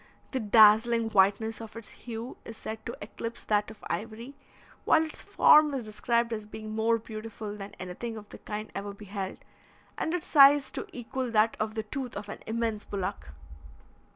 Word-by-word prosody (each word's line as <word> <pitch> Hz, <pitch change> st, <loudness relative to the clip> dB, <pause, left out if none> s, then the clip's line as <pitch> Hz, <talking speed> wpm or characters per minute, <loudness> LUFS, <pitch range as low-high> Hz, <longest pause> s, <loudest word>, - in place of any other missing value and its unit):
The 260 Hz, -, -1 dB
dazzling 225 Hz, +1 st, +5 dB
whiteness 205 Hz, +3 st, +3 dB
of 225 Hz, -1 st, -9 dB
its 230 Hz, -1 st, -9 dB
hue 235 Hz, +1 st, -7 dB
is 225 Hz, -, -9 dB
said 220 Hz, 0 st, -6 dB
to 235 Hz, -, -5 dB
eclipse 230 Hz, +2 st, -6 dB
that 210 Hz, -1 st, +1 dB
of 220 Hz, -, -13 dB
ivory, 230 Hz, +4 st, -5 dB, 0.5 s
while 320 Hz, -, +4 dB
its 315 Hz, -, -8 dB
form 300 Hz, -2 st, +5 dB
is 250 Hz, -4 st, -3 dB
described 235 Hz, +2 st, 0 dB
as 215 Hz, -1 st, -5 dB
being 215 Hz, 0 st, -8 dB
more 225 Hz, +1 st, +2 dB
beautiful 215 Hz, -1 st, -7 dB
than 200 Hz, -1 st, -8 dB
anything 205 Hz, +6 st, -5 dB
of 210 Hz, -1 st, -10 dB
the -, -, -11 dB
kind 215 Hz, +1 st, -6 dB
ever 200 Hz, 0 st, -5 dB
beheld, 200 Hz, -2 st, -5 dB, 0.6 s
and 320 Hz, -, -1 dB
its 350 Hz, -, -3 dB
size 280 Hz, -2 st, +7 dB
to -, -, -5 dB
equal 250 Hz, +1 st, -4 dB
that 220 Hz, 0 st, +3 dB
of 215 Hz, 0 st, -2 dB
the 220 Hz, -, -2 dB
tooth 255 Hz, +3 st, -5 dB
of 205 Hz, -, -7 dB
an -, -, -6 dB
immense 225 Hz, -1 st, -1 dB
bullock. 185 Hz, -, -4 dB
220 Hz, 180 wpm, -29 LUFS, 210-235 Hz, 0.6 s, size